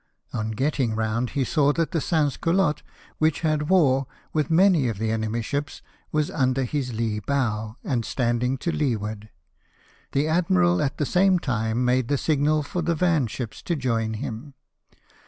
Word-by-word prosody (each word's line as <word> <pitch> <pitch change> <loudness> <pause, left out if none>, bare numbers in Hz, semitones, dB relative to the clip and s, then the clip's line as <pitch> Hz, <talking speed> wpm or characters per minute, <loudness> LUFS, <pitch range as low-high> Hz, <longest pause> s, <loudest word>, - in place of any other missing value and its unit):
On 110 0 -2
getting 125 0 0
round, 110 +2 -1
he 135 - +3
saw 145 +2 +2
that 165 0 -1
the 165 - 0
Sans 150 -5 +1
Culottes, 165 -3 +1 0.4
which 155 -1 +2
had 155 -1 0
wore, 135 -8 +3 0.3
with 155 -3 0
many 170 -4 +4
of 115 -4 -2
the 110 +1 -1
enemy's 110 +1 -2
ships, 145 +3 -4 0.3
was 150 -1 0
under 130 0 +1
his 130 0 -2
lee 110 -1 -1
bow, 110 -3 -1
and 120 -4 -1
standing 125 +2 0
to 170 - +2
leeward. 110 -8 -2 0.8
The 140 +3 +1
admiral, 90 - +2
at 145 0 -1
the 150 - 0
same 185 +4 +3
time, 115 -4 -1
made 125 -1 +2
the 145 - +1
signal 150 +1 +1
for 175 +4 -3
the 170 0 0
van 160 -6 +2
ships 115 0 -6
to 170 - -1
join 115 -5 -1
him. 120 +6 -6
135 Hz, 170 wpm, -24 LUFS, 115-155 Hz, 0.8 s, many